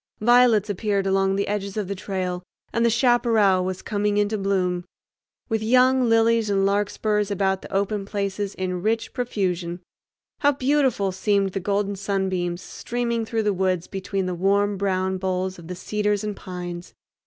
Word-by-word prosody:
Violets 235 -2 +5
appeared 200 -1 -1
along 195 0 +2
the 200 - -1
edges 200 0 -3
of 205 -3 -2
the 200 - -2
trail, 185 -2 -3 0.3
and 230 - +1
the 235 - +4
chaparral 225 -6 +3
was 185 0 -4
coming 205 -1 0
into 205 +1 +1
bloom, 185 -3 0 0.6
with 225 -2 -1
young 255 +2 +4
lilies 225 -1 +3
and 195 -1 +2
larkspurs 205 +1 0
about 190 -1 0
the - - -11
open 200 +1 0
places 200 -1 -3
in 180 -1 -3
rich 225 +3 -1
profusion. 185 -8 -2 0.6
How 290 0 +4
beautiful 265 -7 +1
seemed 195 0 +1
the 195 - -2
golden 200 +1 -1
sunbeams 190 -3 -2
streaming 235 -1 -3
through 225 -1 -1
the 210 -1 +1
woods 185 -2 0
between 195 -1 -3
the 185 - -2
warm 200 +3 +2
brown 190 -1 -1
boles 185 0 -2
of 165 - -11
the 180 - -5
cedars 210 +1 -1
and 210 -1 -3
pines! 175 -2 -7
200 Hz, 165 wpm, -24 LUFS, 190-215 Hz, 0.6 s, Violets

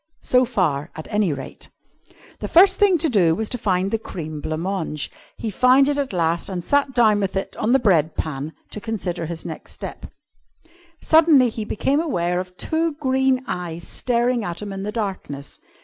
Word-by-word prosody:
So 250 0 +3
far, 175 - 0
at 155 - -8
any 205 -5 +2
rate. 145 - -8 0.7
The - - -4
first 380 +3 +6
thing 395 -3 +5
to 325 - +1
do 180 - +3
was 220 +3 -2
to 245 - -3
find 190 -1 0
the 225 - 0
cream 155 -8 -6
blanc 155 +1 -3
mange. 175 -6 -3 0.3
He 225 - -4
found 255 +6 +5
it 290 0 0
at 275 -2 -2
last 170 -1 0
and 180 -2 -4
sat 280 +1 +1
down 220 -4 +4
with 195 -1 -2
it 195 - -4
on 220 - 0
the 265 - +6
bread 170 - +2
pan 150 0 -4 0.2
to 210 - -6
consider 185 -7 -3
his 165 0 -6
next - - -8
step. - - -8 1.0
Suddenly 315 -6 +5
he 220 -1 -5
became 270 +7 0
aware 180 - 0
of 180 0 -7
two 325 0 0
green 265 -2 +1
eyes 175 -3 -5
staring 240 -1 0
at 175 -2 -4
him 205 -1 -6
in 195 - -5
the 205 +2 -3
darkness. 190 -10 -5
205 Hz, 190 wpm, -22 LUFS, 170-255 Hz, 1.0 s, first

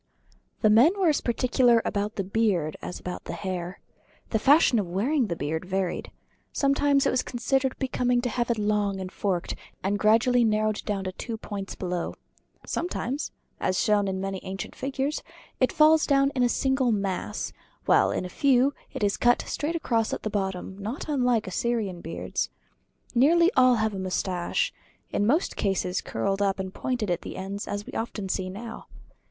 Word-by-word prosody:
The 215 - +6
men 295 - +5
were 365 -4 +4
as 300 - +1
particular 240 0 +3
about 205 +1 -1
the 195 - -1
beard 190 -6 0
as - - -6
about 180 - -6
the - - -5
hair. 180 -2 -4 0.5
The 220 - +2
fashion 275 -2 +5
of 195 - -2
wearing 240 - +1
the 170 - -2
beard 160 +1 -3
varied. 185 -1 -2 0.4
Sometimes 280 0 +2
it - - +3
was 255 - +2
considered 265 +2 -1
becoming 250 -2 +1
to 245 - -1
have 240 +1 -1
it 235 - +1
long 205 -2 0
and 185 -1 -5
forked, 185 -4 -1 0.3
and 200 +2 0
gradually 230 +3 +4
narrowed 215 -1 +2
to 195 -2 -2
two 230 -2 -4
points 200 -2 -6
below. 180 -2 -3 0.5
Sometimes 295 -5 -3 0.3
as 185 - 0
shown 205 -2 +3
in 190 0 -2
many 195 0 -3
ancient 190 0 -6
figures 270 +2 -2 0.4
it 255 - +3
falls 310 0 +5
down 275 -1 +3
in 260 - -1
a 245 - +4
single 265 -1 +1
mass; 195 -3 -2 0.3
while - - +4
in - - -2
a - - -3
few 265 +6 +3 0.2
it - - -3
is 200 -1 +2
cut 240 0 +3
straight 310 +3 -3
across 230 -9 0
at - - -4
bottom 190 -1 -3
not 220 +8 -5
unlike 250 -6 +2
Assyrian 200 -2 -2
beards. 165 - -3 0.6
Nearly 335 +8 +5
all 255 -1 +6
have 220 -1 0
a 195 - -4
mustache, 185 -1 -1 0.4
in 205 - +1
most 305 +9 +2
cases 190 -2 0
curled 195 - -2
up 200 -1 +2
and 190 0 -4
pointed 240 -6 -2
at 175 - -1
the - - -7
ends 195 +2 -5
as 205 0 -4
we - - -10
often 215 -4 -4
see 185 0 -1
now. 225 +4 -8
215 Hz, 175 wpm, -26 LUFS, 190-255 Hz, 0.6 s, The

